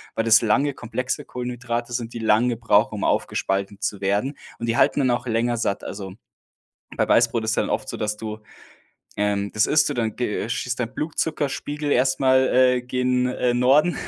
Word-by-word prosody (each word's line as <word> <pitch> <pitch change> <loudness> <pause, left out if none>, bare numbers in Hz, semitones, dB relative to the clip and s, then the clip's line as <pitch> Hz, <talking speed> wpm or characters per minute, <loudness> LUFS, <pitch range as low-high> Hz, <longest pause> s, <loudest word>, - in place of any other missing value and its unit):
weil 115 - 0
das 115 0 +6
lange, 135 +6 +2
komplexe 125 +4 -4
Kohlenhydrate 120 -1 -4
sind, 120 -1 -4
die 115 - -5
lange 115 +2 +2
brauchen, 110 -2 +2
um 100 - -4
aufgespalten 100 +1 -1
zu 100 - -2
werden 100 +9 -1 0.2
und 115 - -4
die 115 +1 0
halten - - +3
dann 130 -2 +2
auch 120 +1 -2
länger 120 +1 0
satt. 100 -3 -2
Also, 95 -2 -7 0.8
bei - - +1
Weißbrot 115 -1 +3
ist 110 +1 0
ja - - +3
dann - - -3
oft - - -2
so, - - -5
dass 105 0 -2
du, 110 0 -6 0.8
ähm 100 -1 0
das 110 - +2
isst 150 - +3
du - - -2
dann 115 -4 -2
ge 110 -3 -2
schießt 125 +1 -3
dein 120 0 -3
Blutzuckerspiegel 150 -1 -2
erstmal, 130 0 +3
äh, 125 -1 +4
gen, 125 0 0
äh, 125 -1 0
Norden. 135 +8 +3
120 Hz, 190 wpm, -23 LUFS, 110-130 Hz, 0.8 s, das